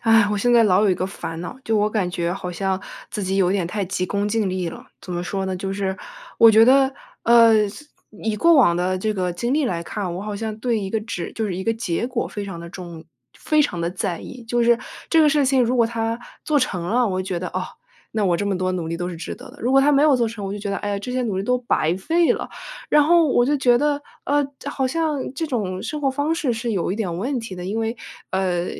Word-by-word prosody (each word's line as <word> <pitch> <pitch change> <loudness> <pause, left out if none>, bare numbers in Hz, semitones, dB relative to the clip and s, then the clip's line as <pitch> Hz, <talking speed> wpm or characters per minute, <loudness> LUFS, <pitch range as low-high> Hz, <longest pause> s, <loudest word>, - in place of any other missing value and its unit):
唉， 225 -2 +5
我 210 - 0
现 245 +4 +2
在 235 -1 +6
老 190 0 +4
有 205 - +4
一 - - +3
个 185 - -1
烦 165 -4 -6
恼， 175 - -6
就 220 -1 +1
我 210 0 +3
感 210 -5 -1
觉 175 -1 -1
好 185 -1 -5
像 190 +1 -1 0.3
自 210 - -4
己 190 0 -1
有 185 -2 +3
一 - - +1
点 190 - 0
太 200 +3 -2
急 185 0 -2
功 200 +2 -1
近 215 -2 0
利 185 -2 -2
了。 - - -10
怎 180 - -7
么 175 0 -2
说 190 +1 -3
呢， 190 - -2
就 195 +1 -4
是 195 -1 -2 0.4
我 230 - +9
觉 220 +1 +7
得， 265 +2 +5 0.3
呃， 230 -3 +6
自 295 +9 -11 0.2
以 215 0 -3
过 335 +8 +5
往 235 - +5
的 185 +1 0
这 215 +3 -1
个 180 -2 -1
经 235 +9 -1
历 305 0 +2
来 170 -9 -2
看， 185 +1 -4
我 - - -4
好 210 0 -4
像 215 +1 -4
对 235 -1 0
一 195 -2 -4
个 220 - 0
纸 205 -6 -5
就 220 - -2
是 190 - -3
一 190 - -3
个 225 - +1
结 225 -2 -2
果 250 -1 -2
非 205 -1 -6
常 195 -4 -7
地 170 0 -8
重 170 -2 -9 0.3
非 305 -1 +2
常 180 -12 -2
地 170 +1 -1
在 185 -1 -3
意。 255 -1 -9
就 240 +1 0
是 235 0 +5 0.3
这 325 - +4
个 305 - +5
事 290 -1 +3
情 260 -1 +3
如 245 +2 +1
果 235 -2 +4
它 230 0 -2 0.3
做 300 -2 +2
成 195 -9 -1
了， 235 +7 +2
我 195 - -2
会 185 - -1
觉 185 -2 -3
得， 180 - -4
哦， - - -3 0.5
那 220 - -1
我 175 -2 +2
这 205 - -2
么 195 -2 0
多 185 0 0
努 175 -3 -3
力 165 - -2
都 175 0 -2
是 175 - -6
值 165 - -6
得 - - -12
的。 - - -16
如 245 +3 +1
果 270 - +6
它 285 +2 +4
没 280 0 +4
有 300 -2 +5
做 240 -3 +1
成， 220 -2 -7
我 195 - -3
就 205 - -5
觉 205 0 -5
得， 200 - -1
哎 205 - -3
呀， 200 - -1
这 225 +5 -6
些 255 0 -1
努 210 -6 -2
力 - - -1
都 250 +5 +1
白 180 -9 0
费 330 - +2
了。 - - -5 0.4
然 300 - +6
后 335 +2 +5
我 240 -2 +3
就 295 +2 +2
觉 245 -3 +4
得， 290 0 0 0.2
呃， 290 +1 +2
的 285 - -6
好 265 -2 -1
像 300 -1 -1
这 320 +5 -3
种 195 -9 -2
生 300 - -4
活 270 - +2
方 285 +4 0
式 290 -6 0
是 230 +1 -2
有 185 -2 -1
一 - - -3
点 185 -7 -2
问 250 +7 -2
题 225 -4 -7
的。 180 -1 -7
因 200 +4 -2
为， 225 +2 -2 0.3
呃， 180 -2 0
215 Hz, 305 characters per minute, -22 LUFS, 185-250 Hz, 0.5 s, 我